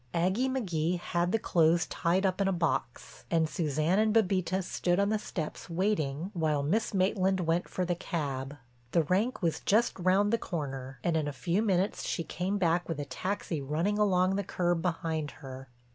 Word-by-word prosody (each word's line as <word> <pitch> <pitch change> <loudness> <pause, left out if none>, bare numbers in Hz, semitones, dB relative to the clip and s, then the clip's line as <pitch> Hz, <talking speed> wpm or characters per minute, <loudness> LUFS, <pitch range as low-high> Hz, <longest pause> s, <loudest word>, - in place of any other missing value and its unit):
Aggie 190 +10 +1
McGee 180 -9 0
had 175 0 -1
the 225 - +3
clothes 170 -4 +3
tied 180 +4 0
up 190 +1 +1
in 195 - +2
a - - +2
box 165 -8 -2
and 165 -2 +2
Suzanne 155 +4 0
and 215 0 +2
Bébita 190 -3 +2
stood 175 0 0
on 200 0 +2
the 215 0 +1
steps 160 -6 -5
waiting 170 -3 -1
while 155 -5 0
Miss 205 +10 0
Maitland 190 -1 +1
went 170 +1 0
for 185 - -1
the 175 - 0
cab. 145 -5 -4 0.4
The 165 - +4
rank 195 - 0
was 165 -2 +1
just 225 +1 +2
round 195 +4 +3
the 230 - +3
corner 135 -5 -5
and 170 - +1
in 155 -2 0
a - - -1
few 170 - 0
minutes 195 -2 +1
she 165 - -2
came 185 +5 -2
back 175 -2 +1
with 160 -3 -2
a 145 - -3
taxi 185 -3 -3
running 165 +10 0
along 190 -2 +3
the 200 - -1
curb 175 -2 0
behind 165 -3 -2 0.2
her. 130 0 -9
175 Hz, 190 wpm, -30 LUFS, 160-195 Hz, 0.4 s, The